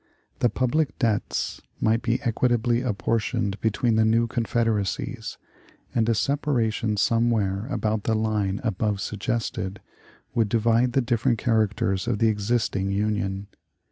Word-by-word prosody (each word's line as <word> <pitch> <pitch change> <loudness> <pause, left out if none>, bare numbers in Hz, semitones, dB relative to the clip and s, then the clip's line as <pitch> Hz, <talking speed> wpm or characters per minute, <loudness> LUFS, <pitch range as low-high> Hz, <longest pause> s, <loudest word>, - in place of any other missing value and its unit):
The 120 - +3
public 130 +6 0
debts 115 -5 -1 0.2
might 115 +1 +2
be 120 0 0
equitably 120 0 +1
apportioned 110 -3 -1
between 110 +1 +1
the 110 - +5
new 115 +2 +3
confederacies, 115 -3 -1 0.6
and 115 -1 +2
a 115 - +3
separation 115 -5 0
somewhere 110 -2 +1
about 110 -6 -1
the 110 - +2
line 105 -3 0
above 105 -2 0
suggested 100 -1 -3 0.5
would 115 -3 +1
divide 115 +2 +2
the 135 - +3
different 115 -1 +1
characters 105 -4 +1
of - - +1
the 115 +1 +3
existing 105 -2 0
Union. 100 -1 -1
110 Hz, 125 wpm, -25 LUFS, 105-120 Hz, 0.6 s, the